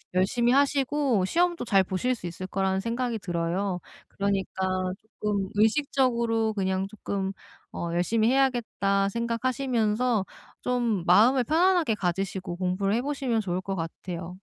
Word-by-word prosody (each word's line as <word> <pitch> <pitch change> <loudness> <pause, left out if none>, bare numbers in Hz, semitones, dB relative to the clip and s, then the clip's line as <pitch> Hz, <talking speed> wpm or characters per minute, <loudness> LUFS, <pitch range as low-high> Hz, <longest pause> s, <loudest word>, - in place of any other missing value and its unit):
열심히 235 +6 +2
하시고 275 -5 +2
시험도 345 - +1
잘 195 -3 +4
보실 195 +8 -1
수 195 - -10
있을 180 +2 -6
거라는 190 0 0
생각이 230 +2 -2
들어요. 180 +1 -2 0.3
그러니까 195 -1 -2 0.6
쪼끔 200 -2 -1
의식적으로 230 -1 +2
그냥 190 -1 -1
쪼끔 200 -2 -3 0.4
어 170 - -4
'열심히 215 +6 +2
해야겠다.' 230 -7 +1
생각하시면서 235 -1 0 0.4
좀 235 -7 0
마음을 230 +9 +5
편안하게 335 0 +3
가지시고 185 -1 -2
공부를 185 +2 0
해 240 - +1
보시면 270 -5 -1
좋을 185 -2 -2
것 195 +1 -4
같아요. 170 0 -5
210 Hz, 325 characters per minute, -27 LUFS, 190-250 Hz, 0.6 s, 마음을